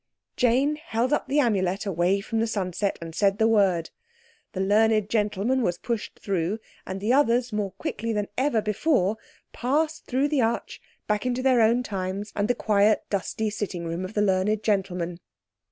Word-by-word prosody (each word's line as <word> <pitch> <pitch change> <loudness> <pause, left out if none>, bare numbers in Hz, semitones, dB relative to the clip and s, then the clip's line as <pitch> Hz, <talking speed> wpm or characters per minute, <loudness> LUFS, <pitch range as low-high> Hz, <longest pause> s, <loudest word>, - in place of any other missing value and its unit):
Jane 265 +5 +2
held 255 -3 -1
up - - 0
the 290 - +2
Amulet 200 -6 +1
away 190 +1 +1
from 225 +2 -2
the 225 - +1
sunset, 195 -2 -2
and 165 -1 -8
said 195 +3 +2
the 220 0 +3
word. 195 -7 +2 0.6
The 185 - -4
learned 215 +1 +3
gentleman 215 +4 +1
was 175 -6 0
pushed 230 +1 -4
through 190 0 -1 0.3
and 190 +1 -4
the 215 +5 +1
others 245 -4 +2
more 205 -3 -2
quickly 225 +3 -4
than 210 -2 -1
ever 255 -5 +1
before 215 - +1 0.4
passed 305 +6 -1
through 265 +3 +1
the 290 -3 +2
arch 230 0 -2 0.2
back 210 +3 0
into 250 +1 -1
their 255 -3 +4
own 230 +3 +3
times 195 0 -4
and 205 0 0
the 245 - +1
quiet 210 -1 +3
dusty 210 +2 -1
sitting 195 -5 -4
room 165 +2 -3
of 185 +3 -7
the 210 - +2
learned 200 +2 +1
gentleman. 180 -5 -1
210 Hz, 175 wpm, -25 LUFS, 195-235 Hz, 0.6 s, their